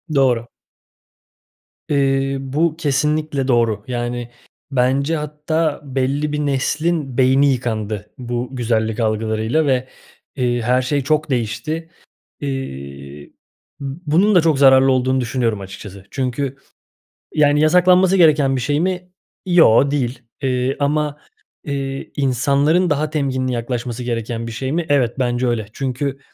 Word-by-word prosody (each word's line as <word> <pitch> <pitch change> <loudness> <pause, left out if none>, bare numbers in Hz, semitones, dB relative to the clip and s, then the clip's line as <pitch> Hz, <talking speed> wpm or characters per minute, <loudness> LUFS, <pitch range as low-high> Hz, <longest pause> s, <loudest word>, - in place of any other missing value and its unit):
Doğru. 125 -4 +2 1.4
Eee, 135 -1 +1
bu 150 +4 0
kesinlikle 150 -2 0
doğru. 115 -4 +1
Yani, 120 -1 -3 0.4
bence 135 +4 +1
hatta 150 +1 -2
belli 135 +2 -1
bir 150 - -2
neslin 145 0 -1
beyni 135 +2 +4
yıkandı 110 -4 -3
bu 120 0 -4
güzellik 110 -2 0
algılarıyla 110 +6 0
ve, 130 -2 +1 0.5
eee, 120 -2 0
her 125 +3 +2
şey 140 +2 -1
çok 155 +2 0
değişti. 145 +7 -2 0.5
İii, 70 - -6 0.5
bunun 165 +8 +1
da 175 - +7
çok 155 -4 +2
zararlı 135 -1 +6
olduğunu 130 0 +1
düşünüyorum 120 -4 -1
açıkçası. 95 0 -10
Çünkü, 135 +1 -2 0.8
yani, 150 0 +3
yasaklanması 180 +3 +5
gereken 150 -6 +4
bir 125 - -2
şey 145 +4 0
mi? 180 +1 -2 0.4
Yoo, 145 -7 +5
değil, 130 -3 -1 0.2
eee, 130 0 0
ama, 150 0 0 0.5
eee, 135 -1 -4
insanların 140 +6 +2
daha 150 +1 0
temkinli 130 -4 -1
yaklaşması 120 0 -3
gereken 115 -1 -3
bir - - -5
şey 130 +4 -4
mi? 170 +1 -1
Evet, 130 -3 +1
bence 125 0 0
öyle. 115 -3 -1
Çünkü 135 +1 -3
135 Hz, 125 wpm, -19 LUFS, 120-150 Hz, 1.4 s, da